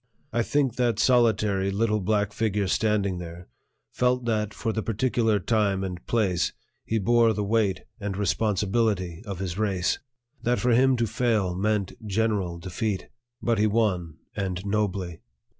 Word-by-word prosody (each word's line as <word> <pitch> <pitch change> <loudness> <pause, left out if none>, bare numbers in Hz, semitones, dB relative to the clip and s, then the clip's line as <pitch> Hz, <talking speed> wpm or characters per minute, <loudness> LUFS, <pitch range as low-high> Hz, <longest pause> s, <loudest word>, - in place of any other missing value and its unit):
I 120 - +2
think 135 +1 0
that 120 -4 +1
solitary 110 -5 +3
little 105 +2 +1
black 105 +1 0
figure 105 -3 0
standing 100 -2 +1
there 85 0 -8 0.4
felt 125 0 +1
that 105 -2 0
for 115 0 -3
the 110 - -1
particular 115 0 +1
time 100 -4 +1
and 90 -2 -5
place 95 -7 +1 0.3
he 110 - -1
bore 115 +2 +4
the 105 0 -2
weight 105 -2 +1 0.2
and 100 -2 -3
responsibility 100 -2 0
of 100 -2 -4
his 95 0 -4
race; 95 -4 0 0.4
that 120 +1 +1
for 125 - +2
him 130 +3 +5
to 120 - +1
fail 110 -4 0
meant 100 +1 0
general 105 -4 0
defeat; 95 +3 -3 0.3
but 115 -3 +1
he 110 - +4
won, 95 -7 0 0.2
and 95 -2 -3
nobly. 100 -4 -1
105 Hz, 150 wpm, -26 LUFS, 95-115 Hz, 0.4 s, him